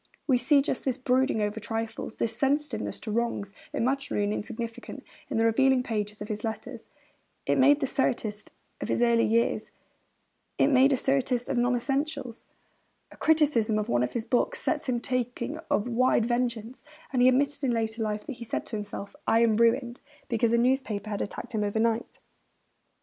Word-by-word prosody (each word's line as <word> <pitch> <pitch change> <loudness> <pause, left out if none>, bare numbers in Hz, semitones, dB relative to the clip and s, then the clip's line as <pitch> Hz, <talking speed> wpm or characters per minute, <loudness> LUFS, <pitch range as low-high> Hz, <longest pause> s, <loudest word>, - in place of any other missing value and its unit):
We 255 -4 +3
see 275 +3 +4
just 265 - -2
this 260 -2 -1
brooding 255 -3 +1
over 210 +1 -2
trifles, 225 +1 -4
this 225 -1 -1
sensitiveness 285 +2 -1
to 215 - -4
wrongs, 215 -3 -2 0.2
imaginary 260 -4 0
or 205 - -1
insignificant, 230 +2 -5 0.3
in - - -2
the 225 - +3
revealing 260 +3 +3
pages 210 -3 -3
of - - -8
his 210 -1 -4
letters. 225 +2 -6 0.6
It - - +2
made 285 +3 +5
the - - +2
satirist 230 -6 -1 0.3
of - - -3
his 240 - +2
earlier 235 -1 +3
years; 230 +2 +1 0.9
it 275 - +4
made 270 0 +5
him - - +4
a - - -3
satirist 255 -2 0
of 255 - 0
non 245 +1 +2
essentials. 270 -1 -2 0.6
A - - -13
criticism 290 -9 +2
of 210 - -2
one 120 0 +2
of 125 - -1
his 230 -2 -2
books 365 - +1
sets 470 - -1
him 240 -1 +1
talking 250 +3 -2
of 210 - +1
wide 245 -1 +2
vengeance; 240 0 -2 0.3
and 250 - +2
he 250 - +7
admitted 280 +3 +2
in 265 - +2
later 225 -1 -1
life 210 -1 -2
that 265 - -6
he 235 - -7
said 230 - -3
to - - -6
himself, 205 -1 -6
'I 225 - +4
am 220 -2 +3
ruined,' 235 +1 +2 0.3
because 230 -1 +1
a 235 - +4
newspaper 235 -4 0
had 205 - -2
attacked 205 - -6
him 215 -1 0
overnight. 225 +2 0
235 Hz, 185 wpm, -27 LUFS, 220-260 Hz, 0.9 s, he